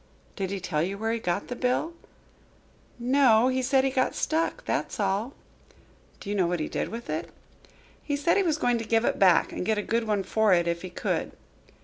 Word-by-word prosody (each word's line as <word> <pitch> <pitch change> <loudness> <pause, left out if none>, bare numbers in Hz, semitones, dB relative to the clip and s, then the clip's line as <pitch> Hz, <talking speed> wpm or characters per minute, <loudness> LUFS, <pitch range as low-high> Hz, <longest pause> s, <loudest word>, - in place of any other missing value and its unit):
"Did 190 -2 -3
he 200 0 -3
tell 165 -4 -1
you 190 +4 -2
where 220 +2 -1
he 230 - -1
got 180 -1 -2
the 245 - -5
bill?" 250 +7 0 1.0
"No, 245 -1 +4
he 260 0 0
said 260 +1 +2
he 270 - +1
got 260 -1 0
stuck, 330 +10 -1
that's - - -2
all." 205 +6 -1 0.9
"Do - - -11
you - - -1
know 185 -4 +2
what 175 0 -1
he 155 - -2
did - - -3
with 235 +1 -7
it?" 155 +1 -3 0.7
"He 290 - -2
said 300 +4 +2
he 405 - +3
was 325 -5 +1
going 245 -5 +1
to - - -4
give 225 +1 +1
it - - 0
back 185 -4 +4
and - - -4
get 220 +3 0
a 210 - -1
good 230 +2 0
one 205 -2 0
for 210 0 +3
it, 170 -1 +1
if 170 0 -1
he 185 - -6
could." 180 - -2
225 Hz, 225 wpm, -27 LUFS, 190-255 Hz, 1.0 s, No